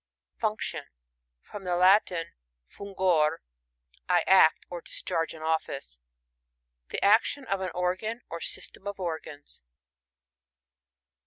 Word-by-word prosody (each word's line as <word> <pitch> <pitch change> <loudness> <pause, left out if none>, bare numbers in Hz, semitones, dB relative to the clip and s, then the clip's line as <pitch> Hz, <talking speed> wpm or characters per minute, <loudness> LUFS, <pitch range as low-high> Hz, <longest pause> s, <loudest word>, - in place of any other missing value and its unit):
Function. 215 -1 -2 0.3
— - - -55
From 205 - -8
the 180 -1 0
Latin, 180 -2 +3 0.3
fun^or^ 180 - +1 0.7
I 180 -1 +4
act, 190 -4 +5
or 175 -1 -6
discharge 165 0 -3
an 155 - -10
office. 140 - -2 0.9
The - - -1
action 225 +6 +3
of 195 -4 -1
an 185 - -2
organ 185 +6 -1
or 170 0 -6
system 195 - -5
of 200 -1 -5
organs. 160 -4 -6
180 Hz, 110 wpm, -28 LUFS, 160-195 Hz, 0.9 s, act